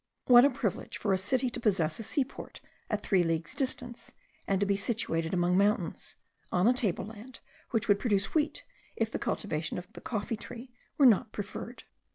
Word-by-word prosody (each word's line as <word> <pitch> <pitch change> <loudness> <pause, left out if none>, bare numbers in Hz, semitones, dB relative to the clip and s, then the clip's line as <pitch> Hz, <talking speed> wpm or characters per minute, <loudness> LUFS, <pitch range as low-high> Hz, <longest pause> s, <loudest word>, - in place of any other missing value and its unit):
What 245 +1 +8
a - - +6
privilege 245 -8 -3
for 200 - 0
a - - +3
city 250 +6 0
to 240 - -3
possess 185 -8 +1
a - - -4
seaport 265 +4 -2 0.3
at 210 -2 -1
three 190 -2 +3
leagues 165 -1 -1
distance, 255 -4 -4 0.3
and 195 -1 +1
to 200 - +2
be 200 0 +2
situated 195 -6 -1
among 180 0 +2
mountains, 200 -4 0 0.4
on 180 +3 +3
a 245 - +6
table 215 -8 -1
land, 225 +4 -10 0.3
which 225 -3 0
would 205 -1 +4
produce 200 -5 0
wheat, 305 -1 0 0.3
if 225 -1 -1
the - - -3
cultivation 155 -6 -2
of 180 0 -6
the - - -10
coffee 220 0 -3
tree 245 +3 -9 0.3
were 280 - +6
not 225 -1 +5
preferred! 215 +4 -6
210 Hz, 190 wpm, -30 LUFS, 190-245 Hz, 0.4 s, What